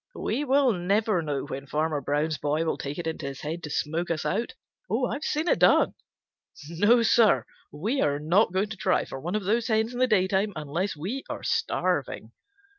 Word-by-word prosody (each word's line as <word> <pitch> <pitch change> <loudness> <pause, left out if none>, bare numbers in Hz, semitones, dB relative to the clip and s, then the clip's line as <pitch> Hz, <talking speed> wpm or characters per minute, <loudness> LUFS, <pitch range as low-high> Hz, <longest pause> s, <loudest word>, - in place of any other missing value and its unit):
We 290 - -2
will 270 -2 +3
never 200 +2 +1
know 145 -3 -3
when 135 +1 -7
Farmer 155 0 -1
Brown's 145 +2 -1
boy 150 +3 0
will 160 - -1
take 140 +1 -5
it 175 - -4
into 160 -3 -4
his 135 -1 -7
head 160 +3 -4
to 150 - -6
smoke 160 +4 -2
us 165 -2 -2
out. 230 +4 -2 0.4
I've 285 - -1
seen 310 +3 -1
it - - +2
done. - - +5 0.7
No, 205 +9 +3
Sir, 215 - +4 0.3
we 215 - -1
are 145 -1 +1
not 175 +8 +2
going 190 +3 0
to 215 - -6
try - - +1
for 135 - -7
one 175 +8 -3
of 215 - -1
those 220 +4 +1
hens 220 +1 +1
in 245 - -5
the 255 - +4
daytime 195 -1 +1
unless 155 +6 -3
we 200 - -4
are - - -5
starving." - - -1
175 Hz, 195 wpm, -26 LUFS, 150-220 Hz, 0.7 s, done